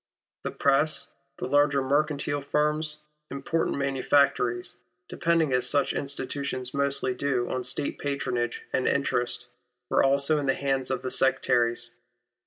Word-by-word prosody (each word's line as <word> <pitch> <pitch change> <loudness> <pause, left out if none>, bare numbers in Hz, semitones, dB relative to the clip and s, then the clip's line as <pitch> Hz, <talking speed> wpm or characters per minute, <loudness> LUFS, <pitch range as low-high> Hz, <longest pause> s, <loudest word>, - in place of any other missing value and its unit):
The - - -3
press, 140 +2 +1 0.3
the - - -4
larger 145 +1 +3
mercantile 145 +1 0
firms, 150 +1 0 0.3
important 140 +4 -1
manufactories, 140 -3 +1 0.3
depending 165 -4 +1
as 125 0 +2
such 145 -1 +1
institutions 140 -2 -3
mostly 140 -2 +1
do 125 -2 -1
on 130 -1 -2
State 125 +3 -2
patronage 130 -4 -2
and 130 - +1
interest, 125 -3 0 0.5
were - - +4
also 140 +3 +3
in 140 - -3
the 135 - +2
hands 135 -2 -1
of 130 -2 -2
the 130 - -3
Sectaries. 120 -2 +1
140 Hz, 130 wpm, -27 LUFS, 130-145 Hz, 0.5 s, were